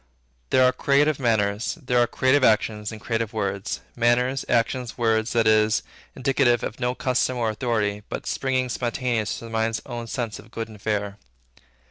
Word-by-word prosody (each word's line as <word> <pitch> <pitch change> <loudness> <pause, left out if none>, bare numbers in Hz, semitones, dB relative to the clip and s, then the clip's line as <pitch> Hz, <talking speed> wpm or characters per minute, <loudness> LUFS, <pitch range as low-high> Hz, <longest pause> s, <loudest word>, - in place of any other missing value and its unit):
There 130 - +4
are 125 - +5
creative 145 +1 +2
manners, 110 -3 0
there 125 -4 +1
are 120 - +4
creative 130 +3 +2
actions, 105 -1 +2
and 110 - -8
creative 115 0 -2
words; 100 -2 -2
manners, 125 +3 +2
actions, 120 +1 0
words, 110 -1 +1
that 115 -1 +3
is, 110 0 +3 0.3
indicative 130 -3 +2
of 110 - -5
no 125 +1 0
custom 130 0 0
or 115 -2 0
authority, 105 -2 -1
but - - -5
springing 130 -1 -1
spontaneous 120 -2 -1
from 115 - -9
the - - -11
mind's 110 0 0
own 120 -2 -6
sense 115 -2 -4
of - - -14
good 115 0 -5
and 105 -2 -13
fair. 105 -1 -2
115 Hz, 170 wpm, -24 LUFS, 110-125 Hz, 0.3 s, are